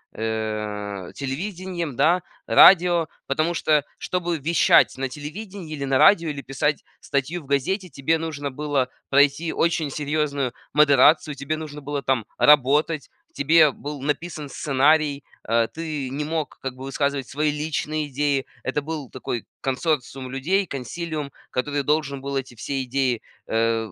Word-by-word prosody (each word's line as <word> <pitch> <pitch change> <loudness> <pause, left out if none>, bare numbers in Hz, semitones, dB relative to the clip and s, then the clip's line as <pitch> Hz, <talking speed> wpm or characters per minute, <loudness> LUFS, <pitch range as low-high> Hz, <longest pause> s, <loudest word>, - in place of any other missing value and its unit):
э, 105 -3 -3
телевидением, 170 +2 -4
да, 175 +3 +4 0.3
радио. 175 -3 +7 0.2
Потому 155 +5 0
что, 150 -3 +2
чтобы 175 -2 -2
вещать 155 -1 +4
на 135 0 -2
телевидении 165 - -7
или 140 -2 -4
на 135 -1 +2
радио, 170 +1 +5
или 145 -2 -4
писать 145 +3 -1 0.2
статью 145 +4 -2
в - - -16
газете, 170 +8 -1
тебе 140 +4 0
нужно 150 -3 -4
было 140 -2 -1 0.2
пройти 145 +4 +3
очень 165 -3 0
серьезную 145 -3 -1 0.2
модерацию, 150 +1 +5
тебе 140 +3 -3
нужно 150 -2 -7
было 145 0 -3
там 130 -5 0
работать, 150 +2 +4 0.2
тебе 155 +1 +5
был 145 0 -7
написан 150 +1 -3
сценарий, 145 +1 +2 0.2
а, 115 0 +2
ты 155 -5 -5
не 140 +3 -3
мог 155 0 -3
как 130 -1 -4
бы 130 +1 -8
высказывать 140 -1 -1
свои 150 +1 0
личные 150 0 -2
идеи, 140 0 0 0.2
это 145 +3 -1
был 150 -3 -5
такой 120 -3 -4 0.2
консорциум 135 -2 -2
людей, 185 +9 +1
консилиум, 150 +1 -5 0.2
который 145 +2 -1
должен 140 -2 0
был 140 0 -4
эти 130 -2 -5
все 135 +4 -3
идеи, 125 -2 0 0.3
э, 115 -1 0
145 Hz, 145 wpm, -23 LUFS, 135-155 Hz, 0.3 s, радио